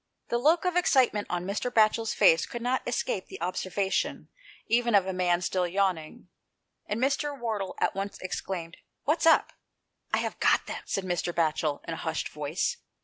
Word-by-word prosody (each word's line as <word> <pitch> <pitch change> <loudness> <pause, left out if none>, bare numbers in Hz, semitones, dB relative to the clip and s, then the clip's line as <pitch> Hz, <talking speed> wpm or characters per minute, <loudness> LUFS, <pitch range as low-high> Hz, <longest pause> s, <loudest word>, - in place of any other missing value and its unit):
The 235 - +1
look 325 +8 +3
of 360 - +1
exciteiaent 260 -11 +3
on 175 0 -2
Mr. 200 +5 -2
Batchel's 225 -1 +2
face 160 -1 +5
could 240 -1 -6
not 255 +1 +1
escape 240 -5 -2
the - - -9
obser 180 +2 -3
vation 195 0 -1 0.4
even 235 -1 +2
of 195 -2 +5
a 190 - -2
man 180 -1 +1
still 180 0 0
yawning, 180 -4 -1 0.6
and 210 +2 -2
Mr. 275 +2 0
Wardle 215 -5 -3
at - - +1
once 195 +1 -4
exclaimed 180 -2 -5
" - - -53
What's 310 +4 +2
up? 325 - +5 0.3
" - - -45
"I - - +2
have - - -3
got - - +3
them," - - -5
said 195 - -1
Mr. 175 -1 -1
Batchel, 155 -3 0
in 165 - -3
a - - -5
hushed 160 -1 -3
voice. 150 - -2
195 Hz, 190 wpm, -28 LUFS, 175-240 Hz, 0.6 s, face